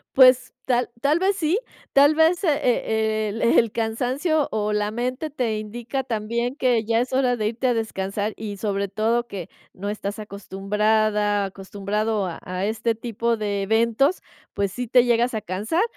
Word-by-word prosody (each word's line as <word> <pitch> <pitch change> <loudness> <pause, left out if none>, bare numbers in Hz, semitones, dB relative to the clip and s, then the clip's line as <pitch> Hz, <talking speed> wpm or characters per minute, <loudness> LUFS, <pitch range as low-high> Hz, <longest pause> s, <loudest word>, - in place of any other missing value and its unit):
Pues, 255 -1 +6
tal 250 -1 +1
tal 290 +4 +3
vez 385 +2 +2
sí, 350 +4 +1 0.3
tal 285 +2 +5
vez, 320 +2 +4
eh, - - +2 0.2
eh, 220 -3 +1
el 210 +2 -4
el 230 -1 +3
cansancio 260 +8 0
o 210 -1 -1
la 210 0 0
mente 250 +7 -3
te 245 -7 -1
indica 240 +5 -4
también 235 +2 -2
que 245 -6 +1
ya 230 +1 +2
es 250 - -3
hora 255 -2 +2
de 215 -2 -1
irte 235 +4 -1
a 245 - +3
descansar 205 -2 -2
y 210 -2 -5
sobre 200 0 -2
todo 225 +4 0
que 190 -7 -7 0.2
no 200 +2 -5
estás 205 0 -4
acostumbrada, 210 +1 0
acostumbrado 200 +2 -2
a 170 - -6
a 185 +1 -4
este 225 +2 0
tipo 230 0 -1
de 205 -2 -2
eventos, 230 - +2 0.3
pues 200 -2 -1
sí, 250 +2 -4
te 250 +1 +5
llegas 240 0 +2
a 220 - -2
cansar, 210 - -1
225 Hz, 175 wpm, -23 LUFS, 210-250 Hz, 0.3 s, Pues